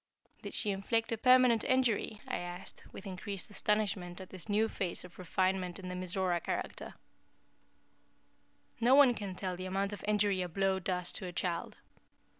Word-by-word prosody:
"Did - - -3
she 210 - +3
inflict 225 +4 0
a 230 - 0
permanent 250 -3 +6
injury?" 235 -4 +1
I - - -1
asked, 175 +1 -8
with 195 - -10
increased 195 +1 -5
astonishment 200 -4 -1
at 190 - -10
this 185 +3 -8
new 215 +2 +3
phase 185 -5 -3
of 180 0 -13
refinement 185 0 0
in 185 -2 -7
the 180 - -4
Mizora 185 -1 -1
character. - - -4 1.8
"No 240 +3 +5
one 275 -3 +7
can 200 -5 -5
tell 185 -1 -3
the 185 +1 -5
amount 195 +2 -1
of 205 - -8
injury 205 -2 +2
a 180 - -2
blow 195 +2 +1
does 180 -1 -2
to 185 - -4
a - - -5
child. 175 -1 -3
195 Hz, 170 wpm, -33 LUFS, 180-210 Hz, 1.8 s, one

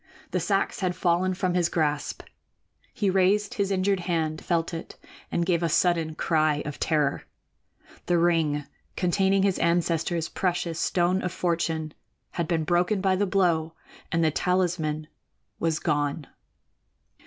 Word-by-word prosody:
The - - 0
sacks - - 0
had 180 -3 -1
fallen 180 +1 +1
from 185 -1 0
his 175 -1 +2
grasp. 150 -3 -1 0.7
He 205 -6 0
raised 195 +2 +2
his 200 -2 -1
injured 195 0 +1
hand, 160 -3 -2
felt 170 -1 0
it, 165 - -7 0.3
and 170 - 0
gave 170 -2 +1
a 170 - +1
sudden 165 -1 +2
cry 155 -3 +1
of 150 - -6
terror. 150 -3 0 0.8
The 175 - +3
ring 160 -4 +2 0.3
containing 190 +2 +2
his 195 -2 +1
ancestor's 170 0 +1
precious 175 -3 -2
Stone 180 +2 +1
of 180 - -2
Fortune 165 -3 -1 0.4
had 170 -2 -2
been 165 -2 0
broken 180 +5 +1
by 190 -1 +2
the 200 +2 +1
blow 170 -4 +1 0.4
and 165 0 +2
the 160 - +3
talisman 170 -3 0 0.5
was 165 -1 +1
gone. 145 -1 -1
170 Hz, 145 wpm, -26 LUFS, 160-185 Hz, 0.8 s, The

